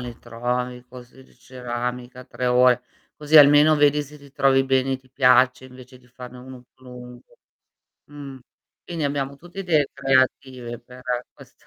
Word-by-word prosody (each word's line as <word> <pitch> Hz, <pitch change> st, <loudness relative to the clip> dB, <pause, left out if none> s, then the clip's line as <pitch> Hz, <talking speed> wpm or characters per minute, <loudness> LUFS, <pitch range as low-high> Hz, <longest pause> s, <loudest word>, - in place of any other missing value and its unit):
li 120 Hz, -1 st, -8 dB
trovi 125 Hz, +1 st, -4 dB
corsi 125 Hz, +1 st, -15 dB
di -, -, -25 dB
ceramica 125 Hz, 0 st, -7 dB
3 125 Hz, -, -5 dB
ore, 125 Hz, 0 st, +3 dB, 0.3 s
così 150 Hz, +1 st, +2 dB
almeno 145 Hz, +1 st, +7 dB
vedi 145 Hz, 0 st, +2 dB
se 150 Hz, +1 st, -14 dB
ti 140 Hz, -1 st, -17 dB
trovi 135 Hz, -1 st, +2 dB
bene 135 Hz, 0 st, 0 dB
e -, -, -1 dB
ti 130 Hz, -1 st, -28 dB
piace, 130 Hz, -1 st, +3 dB
invece 130 Hz, 0 st, -15 dB
di 125 Hz, -, -25 dB
farne 125 Hz, 0 st, -12 dB
uno 130 Hz, 0 st, -12 dB
più 130 Hz, -, -25 dB
lungo. 125 Hz, -1 st, -14 dB, 0.7 s
Mhmm. 140 Hz, -2 st, -11 dB, 0.5 s
Quindi 165 Hz, -3 st, -5 dB
abbiamo 140 Hz, -1 st, -3 dB
tutti 175 Hz, +6 st, -15 dB
idee 155 Hz, -6 st, +1 dB
creative 130 Hz, -3 st, -1 dB
per 125 Hz, +1 st, -15 dB, 0.3 s
questa -, -, -20 dB
130 Hz, 160 wpm, -22 LUFS, 125-140 Hz, 0.7 s, almeno